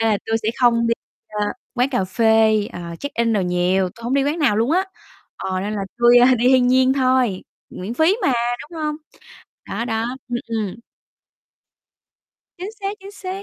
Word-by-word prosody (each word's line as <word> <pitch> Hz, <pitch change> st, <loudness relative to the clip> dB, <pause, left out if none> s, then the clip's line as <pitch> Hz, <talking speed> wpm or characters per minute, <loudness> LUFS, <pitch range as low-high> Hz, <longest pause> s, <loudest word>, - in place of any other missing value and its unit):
nên 225 Hz, -, +2 dB
là 210 Hz, -, +2 dB
tui 225 Hz, -, +1 dB
sẽ 215 Hz, -, 0 dB
không 235 Hz, -2 st, +4 dB
đi, 230 Hz, -, +2 dB, 0.4 s
ờ, 210 Hz, -1 st, -2 dB, 0.3 s
quán 250 Hz, +1 st, +2 dB
cà 220 Hz, -8 st, 0 dB
phê, 220 Hz, +1 st, +3 dB
ờ, 170 Hz, -1 st, -7 dB
check 285 Hz, -, -5 dB
in 230 Hz, -1 st, +1 dB
đồ 210 Hz, -, +2 dB
nhiều, 180 Hz, +1 st, +1 dB
tui 230 Hz, +5 st, -15 dB
hổng 245 Hz, +3 st, -1 dB
đi 275 Hz, -, +2 dB
quán 295 Hz, +4 st, -1 dB
nào 265 Hz, -10 st, +2 dB
luôn 230 Hz, +6 st, +1 dB
á, 370 Hz, +3 st, +2 dB, 0.5 s
ờ, 185 Hz, -1 st, -3 dB
nên 205 Hz, +2 st, -3 dB
là 200 Hz, -, -2 dB, 0.2 s
tui, 240 Hz, 0 st, +7 dB
a, 250 Hz, +1 st, +6 dB
đi 245 Hz, +2 st, +2 dB
thiên 255 Hz, -1 st, +5 dB
nhiên 260 Hz, +1 st, +4 dB
thôi, 255 Hz, -7 st, +1 dB, 0.3 s
miễn 195 Hz, +6 st, -6 dB
phí 320 Hz, +8 st, +3 dB
mà, 275 Hz, -, +3 dB, 0.3 s
đúng 325 Hz, +2 st, -10 dB
hông? 300 Hz, 0 st, -1 dB, 0.7 s
Đó, 235 Hz, -, -3 dB
đó, 225 Hz, -1 st, -1 dB, 0.2 s
ừm, 240 Hz, 0 st, -1 dB
ừm. 220 Hz, -4 st, -3 dB, 1.8 s
Chính 375 Hz, +4 st, -5 dB
xác, 395 Hz, +1 st, -3 dB
chính 390 Hz, +1 st, -10 dB
xác, 390 Hz, -1 st, -6 dB
235 Hz, 195 wpm, -21 LUFS, 210-270 Hz, 1.8 s, tui